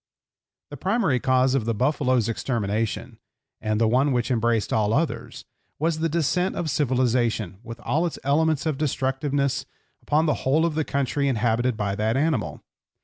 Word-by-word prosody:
The 145 - -7
primary 185 - +1
cause 130 +1 +2
of 135 -5 +1
the 115 -1 0
buffalo's 130 -2 +1
extermination, 115 -2 -2 0.4
and 110 0 0
the 115 - +3
one 130 +5 +3
which 125 0 0
embraced 115 -2 +1
all 105 -1 +2
others, 160 +1 -2 0.3
was 160 +1 0
the 165 +1 0
descent 170 +4 0
of 160 -4 -2
civilization, 120 - 0
with 115 -1 -9
all 155 +8 0
its 165 - -6
elements 155 +2 +2
of 155 -3 -1
destructiveness, 140 -1 -1 0.3
upon 155 +2 +1
the 150 - 0
whole 155 +5 +2
of 170 - 0
the 155 +1 0
country 140 0 -1
inhabited 120 -1 +1
by 100 -1 -1
that 110 +4 0
animal. 145 -6 -1
130 Hz, 160 wpm, -24 LUFS, 115-150 Hz, 0.4 s, the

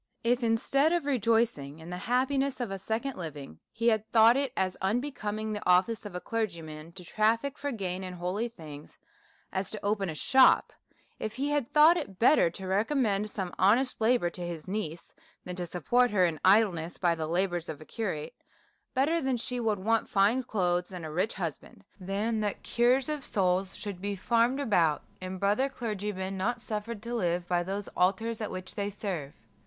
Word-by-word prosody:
If, 245 +1 +2
instead 270 +7 +2
of 345 -2 +1
rejoicini^ 225 - +1
in 165 +2 -9
the 180 - -4
happiness 270 +2 +1
of 240 -5 -3
a 195 - -4
second 230 +7 -3
living", 150 - -7
he 230 +1 +2
had 220 -1 0
thought 225 +1 +7
it 275 -1 0
as 185 -1 0
unbecoming 215 -1 -2
the 210 - -4
office 190 +5 +3
of 190 - -10
a - - -2
clergyman 170 -8 -4
to 180 - -11
traffic 230 +8 +1
for 285 0 -3
gain 190 -5 -3
in 185 -1 -6
holy 180 +6 -2
things, 155 -8 -11 0.6
as 190 0 -1
to 215 -2 -6
open 200 -2 0
a 160 - -4
shop: 265 - +5 0.5
If 215 +2 -4
lie 280 +2 0
had 290 -5 0
thought 310 +3 +7
it 280 - -5
better 240 - +5
ta 190 +3 -8
recommend 210 +1 +1
some 190 -4 -4
honest 230 +7 +3
labour 220 -6 +3
to 180 - -8
his 175 -2 -5
niece, 175 -5 -4 0.3
than 180 - -5
to 175 -1 -3
support 245 +9 +2
her 190 -4 +3
in 165 -3 -1
idle 205 +2 +6
ness 165 +1 -6
by 175 -2 +2
the 160 -1 -3
labours 175 0 -1
of 155 -3 -5
a 155 - -12
curate; 195 -2 -4 0.6
better 310 +6 +2
that 265 -2 0
she 250 +2 -4
should 225 -3 0
want 225 +4 0
fine 210 +6 +3
clothes 180 -7 0
and 180 -3 -6
a 155 - -6
rich 185 +8 -1
husband, 170 -6 -6 0.2
than 205 +4 -1
the 205 -2 -1
cure 245 +3 +3
of 300 -2 -3
souls 185 -3 0
should 200 -4 -6
be 200 0 -2
farmed 235 +6 +2
about, 175 - +2 0.2
and 185 0 -5
brother 210 +8 +2
clergymen 205 -6 -4
not 240 +6 -1
suffered 220 -1 -5
to 235 +1 -5
live 175 -5 0
by 175 -1 +1
those 195 +3 -4
altars 215 +5 0
at 215 - -2
which 185 0 -7
they 200 0 -2
serve. 185 -8 -5
205 Hz, 190 wpm, -29 LUFS, 180-235 Hz, 0.6 s, thought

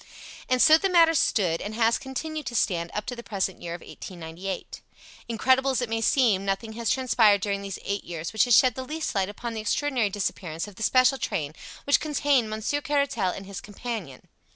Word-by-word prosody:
And 255 -1 +4
so 315 0 +7
the 390 - +1
matter 335 -2 +5
stood, 180 - +1
and 210 +1 -5
has 230 0 +2
continued 295 +2 -5
to 240 - -4
stand 170 -6 0
up 210 - -2
to 250 - -4
the 235 - -8
present 195 -4 -3
year 170 0 -5
of 175 - -11
1898. 180 +2 -7 0.5
Incredible 260 +4 +2
as 265 - +1
it 240 - -4
may 225 0 0
seem, 225 -6 +3
nothing 200 +3 -2
has 230 0 -2
transpired 240 -7 +4
during 200 0 -2
these 195 -1 -5
eight 200 0 -2
years 165 +1 -6
which 220 - +4
has 245 -3 +5
shed 255 -2 +5
the 260 - -5
least 310 +4 -4
light 195 -1 0
upon 230 +3 -6
the 220 - -4
extraordinary 245 0 0
disappearance 185 -4 -3
of 205 - -11
the 195 - -13
special 255 +3 +4
train 150 -3 -2 0.3
which 285 - +3
contained 285 -6 +1
Monsieur 220 +7 -2
Caratal 280 -9 0
and 195 +2 -6
his 195 -1 -7
companion. 205 - -7
225 Hz, 205 wpm, -26 LUFS, 195-260 Hz, 0.5 s, so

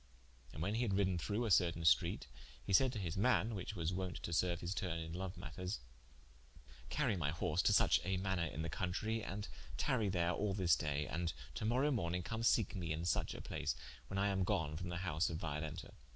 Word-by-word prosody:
And 80 - -4
when 100 +4 0
he 115 - 0
had 115 -5 +1
riden 95 -3 +2
through 105 +7 -1
a 110 - 0
certain 85 -2 +4
streat, 80 - +4 0.4
he 100 - -1
said 130 +6 +6
to - - -3
his 85 -5 -3
man, 115 +1 +3
which 100 +1 -4
was 85 -1 -1
wonte 90 -1 -3
to - - -3
serue 85 +1 +2
his 85 +2 -2
tourne 90 -5 -2
in 80 0 -5
loue 95 +1 -3
matters: 90 +3 -4 1.1
"Carie 135 -8 +1
my 80 -5 0
horse 80 +1 0
to - - +4
such - - +5
a 95 +1 0
manour 95 -2 0
in 80 0 -4
the 85 - -2
countrie, 110 +7 -1
and 100 +2 -4 0.3
tarrie 110 - +1
there 85 -2 +2
all 100 +2 0
this 90 -7 +4
day, 75 +1 -1
and 85 -1 -2 0.2
to - - -3
morowe 130 +6 +3
morning 90 -5 -1
come 110 +5 -3
seeke 115 -2 +3
mee 90 -5 -3
in 80 +1 -2
suche - - 0
a - - -6
place, - - -2 0.3
when 95 - -4
I 100 +1 +3
am 95 -1 +1
gone 75 -4 0
from 90 +3 -4
the 85 - -3
house 80 -1 +1
of 80 - -3
Violenta. 75 +2 -4
90 Hz, 225 wpm, -37 LUFS, 85-100 Hz, 1.1 s, said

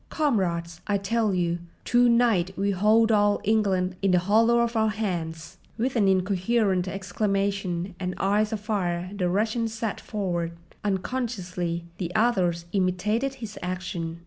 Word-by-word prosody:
Comrades, 175 - -1
I 205 -1 +2
tell 215 +2 0
you, 175 -2 0 0.3
to 245 0 +4
night 225 -6 +2
we 200 +1 +1
hold 215 +4 +4
all 205 -1 +3
England 190 -4 +1
in 195 - +2
the 180 - +4
hollow 220 +6 +4
of 235 0 -1
our 220 -1 +3
hands!" 170 -7 -4 0.2
With 255 +3 -1
an 210 -4 +3
incoherent 190 +1 +1
exclamation 195 -2 -1
and 180 -1 -3
eyes 210 +2 +1
afire 195 -5 -2
the 180 -3 0
Russian 220 +5 0
sat 225 -1 -4
forward. 175 -5 -2 0.3
Unconsciously 185 -5 -2
the 175 -2 -3
others 185 -7 +2
imitated 210 +8 0
his 225 -5 -8
action. 180 -2 -4
195 Hz, 140 wpm, -26 LUFS, 180-220 Hz, 0.3 s, to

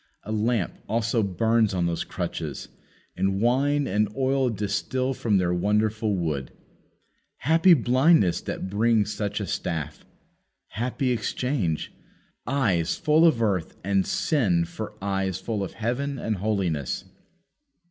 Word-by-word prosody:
A 110 - -6
lamp 110 -3 0 0.2
also 115 +1 +1
burns 110 +2 +1
on 90 -1 +1
those 85 -1 -1
crutches; - - -5 0.5
and 95 0 0
wine 140 +5 +2
and 105 -1 +1
oil 135 -1 +2
distil 115 +5 -1
from 110 -5 +1
their 90 -1 +1
wonderful 105 +3 +1
wood. 75 -7 -2 0.9
Happy 165 +5 +5
blindness 130 - +3
that - - -4
brings 105 +1 +2
such 105 -1 -2
a 100 - -2
staff! 80 -5 -4 0.7
Happy 125 +3 -1
exchange! 120 - -1 0.5
eyes 100 - +1
full 160 0 +4
of 120 -8 +2
earth 95 -7 -1
and 95 0 +1
sin 95 - +1
for - - -7
eyes 95 -2 -1
full 110 -4 -3
of 95 - -6
heaven 135 +5 -2
and 110 -4 -2
holiness! 95 -8 -1
110 Hz, 125 wpm, -25 LUFS, 95-125 Hz, 0.9 s, Happy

